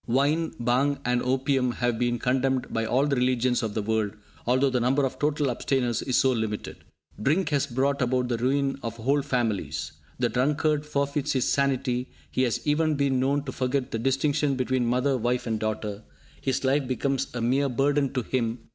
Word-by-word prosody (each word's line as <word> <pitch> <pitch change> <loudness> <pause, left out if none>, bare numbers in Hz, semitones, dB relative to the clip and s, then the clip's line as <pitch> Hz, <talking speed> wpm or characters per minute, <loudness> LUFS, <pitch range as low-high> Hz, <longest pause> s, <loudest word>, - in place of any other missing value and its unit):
Wine, 145 +7 +2
bhang 130 +4 +2
and 125 0 +1
opium 130 -1 +1
have 120 -2 -1
been 120 -1 +1
condemned 130 +1 0
by 115 0 0
all 130 +5 +2
the 145 -1 +1
religions 125 -1 +1
of 110 -3 -3
the 110 - -1
world, 110 -1 0 0.3
although 130 +2 +3
the 125 - +1
number 135 +4 +2
of 130 - -4
total 145 -2 +1
abstainers 120 -2 0
is 130 - 0
so 130 - +4
limited. 110 -3 -3 0.4
Drink 155 - +2
has 140 -2 +1
brought 140 +2 0
about 125 0 +1
the 120 -2 -1
ruin 135 +2 0
of 115 -1 -4
whole 135 +5 +1
families. 105 - -2 0.3
The 120 -1 +1
drunkard 150 +4 +1
forfeits 140 -1 -1
his 130 -2 +1
sanity; 130 -2 0 0.2
he - - 0
has 120 -3 0
even 155 +1 +2
been 140 -2 +1
known 140 +2 +1
to 135 - -5
forget 130 +1 -1
the 115 - -2
distinction 140 +3 +1
between 130 -1 0
mother, 130 +3 +1
wife 125 +2 0
and 110 -2 -1
daughter. 110 -1 -3 0.4
His 135 0 -1
life 135 0 +2
becomes 135 +1 -1
a - - -2
mere 135 +4 +2
burden 140 +2 +1
to 125 - -1
him. 115 -1 -1
130 Hz, 190 wpm, -26 LUFS, 120-140 Hz, 0.4 s, so